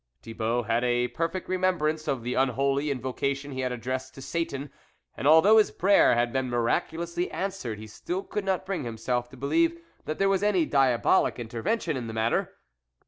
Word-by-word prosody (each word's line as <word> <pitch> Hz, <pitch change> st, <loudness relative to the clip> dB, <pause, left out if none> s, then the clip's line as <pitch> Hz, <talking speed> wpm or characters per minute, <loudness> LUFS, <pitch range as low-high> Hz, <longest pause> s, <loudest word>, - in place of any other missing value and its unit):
Thibault 115 Hz, +1 st, -2 dB
had 115 Hz, +2 st, 0 dB
a 120 Hz, 0 st, +1 dB
perfect 165 Hz, +3 st, -3 dB
remembrance 175 Hz, -4 st, 0 dB
of 135 Hz, -5 st, -1 dB
the 125 Hz, +1 st, -2 dB
unholy 135 Hz, +3 st, +1 dB
invocation 140 Hz, +2 st, -2 dB
he 130 Hz, -, -5 dB
had 130 Hz, -1 st, -1 dB
addressed 130 Hz, +2 st, -4 dB
to 135 Hz, -, -10 dB
Satan, 145 Hz, -4 st, -3 dB, 0.4 s
and 140 Hz, -, -2 dB
although 185 Hz, +8 st, +7 dB
his 215 Hz, -, +3 dB
prayer 195 Hz, -8 st, +4 dB
had 120 Hz, 0 st, 0 dB
been 130 Hz, -1 st, -1 dB
miraculously 165 Hz, +9 st, -1 dB
answered, 185 Hz, -, -4 dB
he 110 Hz, -, -9 dB
still 175 Hz, -, -5 dB
could 210 Hz, -, -4 dB
not 190 Hz, -1 st, -1 dB
bring 185 Hz, -6 st, -3 dB
himself 120 Hz, +1 st, -2 dB
to 130 Hz, -, -14 dB
believe 335 Hz, -, +1 dB, 0.3 s
that 155 Hz, -, -3 dB
there 195 Hz, -, +2 dB
was 195 Hz, -1 st, +2 dB
any 200 Hz, -5 st, +2 dB
diabolic 135 Hz, -5 st, +2 dB
intervention 120 Hz, -, -2 dB
in 125 Hz, -3 st, -4 dB
the 110 Hz, -, -6 dB
matter. 110 Hz, +1 st, 0 dB
140 Hz, 180 wpm, -27 LUFS, 120-175 Hz, 0.4 s, although